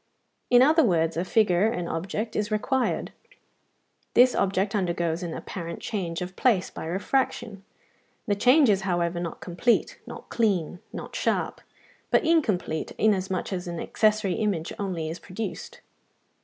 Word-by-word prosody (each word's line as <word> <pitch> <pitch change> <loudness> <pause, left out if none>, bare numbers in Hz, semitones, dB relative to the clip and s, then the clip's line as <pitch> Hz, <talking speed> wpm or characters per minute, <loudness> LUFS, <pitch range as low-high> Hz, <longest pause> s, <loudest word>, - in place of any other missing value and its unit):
In 245 0 +7
other 315 +3 +5
words 165 -7 +2
a 170 - 0
figure, 190 -1 +3
an 180 -7 -2
object, 195 +7 -3
is 210 0 -1
required; 250 +4 0 1.0
this 250 +1 +6
object 195 +1 0
undergoes 170 -4 -1
an 170 -2 -4
apparent 170 -3 -6
change 180 -6 -3
of 180 +1 -8
place 220 -8 +2
by - - -7
refraction: 200 +3 -1 0.6
the 210 - +1
change 255 +8 +5
is 200 -3 +3
however 175 -2 -1
not 170 -1 -5
complete, 180 +7 0
not - - -9
clean, 190 -7 0
not - - -8
sharp; - - -1 0.5
but - - +3
incomplete, 220 - +1
inasmuch 190 -3 0
as 180 -1 -4
an 170 -1 -4
accessory 215 -3 +1
image 195 -7 -1
only 180 -6 -2
is 165 +2 -5
produced. 200 +4 -6
195 Hz, 140 wpm, -26 LUFS, 175-220 Hz, 1.0 s, In